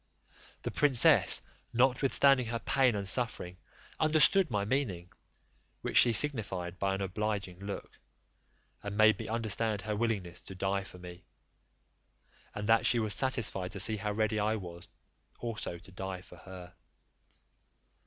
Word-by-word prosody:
The -, -, -3 dB
princess, 135 Hz, -5 st, +4 dB, 0.3 s
notwithstanding 130 Hz, +1 st, +3 dB
her 115 Hz, +1 st, -2 dB
pain 130 Hz, -1 st, +1 dB
and 100 Hz, -1 st, -4 dB
suffering, 100 Hz, -6 st, +1 dB, 0.4 s
understood 155 Hz, +3 st, +4 dB
my 105 Hz, -3 st, -1 dB
meaning; 100 Hz, -8 st, -2 dB, 0.7 s
which -, -, -4 dB
she 120 Hz, -, +6 dB
signified 100 Hz, -9 st, -2 dB
by 95 Hz, 0 st, 0 dB
an 100 Hz, -, -4 dB
obliging 95 Hz, -1 st, -4 dB
look, 100 Hz, 0 st, -8 dB, 0.8 s
and 100 Hz, 0 st, -6 dB
made 110 Hz, 0 st, +4 dB
me -, -, -6 dB
understand 110 Hz, -2 st, -2 dB
her 105 Hz, +1 st, -3 dB
willingness 105 Hz, -6 st, -3 dB
to 95 Hz, -, -10 dB
die 95 Hz, +1 st, -2 dB
for 90 Hz, -, -12 dB
me; 90 Hz, 0 st, -11 dB, 1.3 s
and 105 Hz, 0 st, -5 dB
that 115 Hz, 0 st, +3 dB
she 120 Hz, -, +3 dB
was 110 Hz, -2 st, +2 dB
satisfied 110 Hz, -8 st, -1 dB
to 100 Hz, -, -6 dB
see 110 Hz, +3 st, +4 dB
how 105 Hz, +1 st, -3 dB
ready 110 Hz, 0 st, -1 dB
I 105 Hz, +2 st, 0 dB
was 85 Hz, -4 st, -9 dB, 0.5 s
also 115 Hz, -7 st, -5 dB
to 95 Hz, -, -17 dB
die 95 Hz, 0 st, -6 dB
for 90 Hz, -, -15 dB
her. 90 Hz, 0 st, -12 dB
105 Hz, 145 wpm, -30 LUFS, 95-115 Hz, 1.3 s, she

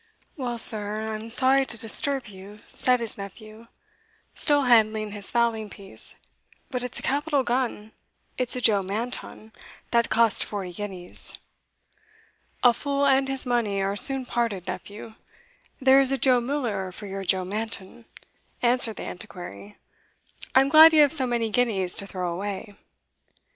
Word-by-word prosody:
"Well, 245 Hz, -4 st, -4 dB
sir, 215 Hz, -1 st, +3 dB
I'm -, -, -4 dB
sure -, -, -4 dB
I'm -, -, -10 dB
sorry 265 Hz, +3 st, +4 dB
to 235 Hz, -, -4 dB
disturb 265 Hz, +5 st, +3 dB
you," 205 Hz, +1 st, -13 dB
said 250 Hz, -1 st, +1 dB
his 225 Hz, -3 st, -5 dB
nephew, 215 Hz, +3 st, -11 dB, 0.7 s
still 290 Hz, -1 st, +1 dB
handling 220 Hz, -3 st, +2 dB
his 205 Hz, -1 st, -8 dB
fowling 230 Hz, -3 st, 0 dB
piece; 195 Hz, -1 st, -8 dB, 0.6 s
"but 250 Hz, -2 st, -2 dB
it's 250 Hz, -1 st, -5 dB
a -, -, -5 dB
capital 285 Hz, 0 st, 0 dB
gun 240 Hz, -4 st, -2 dB, 0.4 s
it's 255 Hz, -1 st, -3 dB
a 250 Hz, -, -4 dB
Joe 210 Hz, -4 st, +4 dB
Manton, 220 Hz, +2 st, -6 dB, 0.4 s
that 235 Hz, -1 st, +2 dB
cost 230 Hz, -2 st, +3 dB
forty 190 Hz, -4 st, -6 dB
guineas." 185 Hz, -2 st, -2 dB, 1.3 s
"A 245 Hz, -1 st, +6 dB
fool 280 Hz, +2 st, -1 dB
and 270 Hz, -1 st, +3 dB
his 270 Hz, 0 st, -2 dB
money 235 Hz, -5 st, -1 dB
are 195 Hz, +1 st, -1 dB
soon 265 Hz, +4 st, +4 dB
parted, 230 Hz, -8 st, -2 dB
nephew 205 Hz, +4 st, -8 dB, 0.7 s
there 265 Hz, +1 st, +5 dB
is 270 Hz, -1 st, +1 dB
a 270 Hz, -, +1 dB
Joe 255 Hz, -2 st, +3 dB
Miller 235 Hz, -8 st, -3 dB
for 205 Hz, +3 st, -9 dB
your 195 Hz, 0 st, -6 dB
Joe 185 Hz, 0 st, 0 dB
Manton," 220 Hz, +2 st, -6 dB, 0.6 s
answered 240 Hz, -2 st, +1 dB
the -, -, -7 dB
Antiquary; 175 Hz, -, -10 dB, 0.8 s
"I 265 Hz, -, +7 dB
am 270 Hz, -, 0 dB
glad 320 Hz, +2 st, +8 dB
you 310 Hz, -, +6 dB
have 290 Hz, -, +3 dB
so 265 Hz, -5 st, +4 dB
many 235 Hz, -2 st, -1 dB
guineas 205 Hz, -7 st, 0 dB
to 200 Hz, -, -3 dB
throw 180 Hz, -3 st, -4 dB
away." 200 Hz, +2 st, -6 dB
225 Hz, 160 wpm, -25 LUFS, 200-255 Hz, 1.3 s, glad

